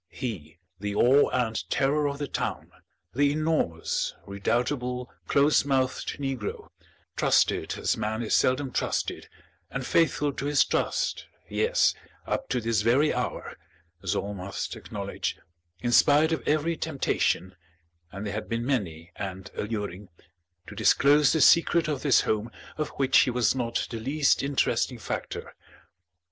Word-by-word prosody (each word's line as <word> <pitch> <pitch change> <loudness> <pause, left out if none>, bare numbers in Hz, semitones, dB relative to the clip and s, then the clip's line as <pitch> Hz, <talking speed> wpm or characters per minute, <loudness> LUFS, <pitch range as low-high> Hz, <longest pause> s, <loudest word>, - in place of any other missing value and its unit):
he, 90 - -6 0.2
the 105 +1 -3
awe 130 +6 +5
and 115 -3 -1
terror 145 +2 +1
of 140 0 -3
the 145 0 -3
town, - - -4 0.4
the 140 +2 +3
enormous, 155 - -1
redoubtable, 125 +5 -2 0.2
close 145 +2 +4
mouthed 135 -2 -1
negro, 135 -6 -4 0.5
trusted - - +2
as - - 0
man 110 +2 -2
is 110 - -2
seldom 130 +1 +2
trusted, - - -2 0.4
and 135 -1 -4
faithful 150 -2 +2
to 135 - -5
his 145 0 +4
trust, - - -1 0.2
yes, - - +2 0.3
up 275 - -3
to 125 - 0
this 115 -2 0
very 130 +8 +3
hour, - - -4 0.5
as 95 - -1
all 100 +1 -2
must 95 0 -5
acknowledge, - - -5 0.4
in 120 - -1
spite 150 +5 +5
of 160 - 0
every 155 +2 +1
temptation 135 - -1 0.6
(and 100 +3 -6
they 105 - -3
had 110 +1 -5
been 115 +1 -2
many 85 - -2
and 95 -1 -6
alluring) 105 -3 -4 0.6
to - - -10
disclose 145 +1 +4
the 160 - +1
secret 170 0 +5
of 150 -4 -2
this 140 -4 +4
home 110 +2 -1 0.3
of 155 -1 -2
which 135 -1 +4
he - - +4
was 125 -2 +2
not 120 -2 -1
the 115 - -4
least 140 +4 +2
interesting 140 -1 0
factor. - - -5
125 Hz, 145 wpm, -27 LUFS, 105-145 Hz, 0.6 s, awe